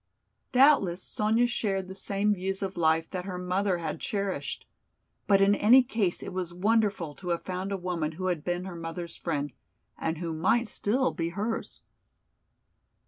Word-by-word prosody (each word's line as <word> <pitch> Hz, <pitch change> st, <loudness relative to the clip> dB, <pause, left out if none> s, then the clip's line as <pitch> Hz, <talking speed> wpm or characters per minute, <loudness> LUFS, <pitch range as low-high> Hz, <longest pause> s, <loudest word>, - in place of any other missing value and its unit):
Doubtless 250 Hz, -10 st, +4 dB
Sonya 220 Hz, +3 st, +1 dB
shared 195 Hz, -5 st, -1 dB
the 190 Hz, -, -7 dB
same 200 Hz, +2 st, 0 dB
views 195 Hz, +1 st, -3 dB
of 195 Hz, 0 st, -3 dB
life 160 Hz, -1 st, +2 dB
that 185 Hz, -1 st, -4 dB
her 185 Hz, -2 st, -4 dB
mother 180 Hz, +1 st, 0 dB
had 160 Hz, -3 st, -4 dB
cherished! 200 Hz, -2 st, -3 dB, 0.6 s
But 195 Hz, -1 st, +5 dB
in 200 Hz, +1 st, +5 dB
any 235 Hz, +6 st, +6 dB
case 220 Hz, -8 st, -1 dB
it 195 Hz, -, -6 dB
was 180 Hz, -2 st, -3 dB
wonderful 200 Hz, -5 st, +1 dB
to 180 Hz, +3 st, -8 dB
have 170 Hz, -1 st, -1 dB
found 185 Hz, +1 st, -4 dB
a 195 Hz, -, 0 dB
woman 175 Hz, -4 st, -2 dB
who 185 Hz, +4 st, -5 dB
had 175 Hz, -5 st, -1 dB
been 175 Hz, +1 st, -2 dB
her 185 Hz, -2 st, -6 dB
mother's 165 Hz, +1 st, -6 dB
friend 145 Hz, -4 st, -3 dB, 0.5 s
and 160 Hz, 0 st, -1 dB
who 165 Hz, 0 st, -3 dB
might 200 Hz, +9 st, +2 dB
still 250 Hz, +5 st, +1 dB
be 165 Hz, 0 st, -2 dB
hers. 210 Hz, +6 st, -4 dB
185 Hz, 170 wpm, -28 LUFS, 170-205 Hz, 0.6 s, any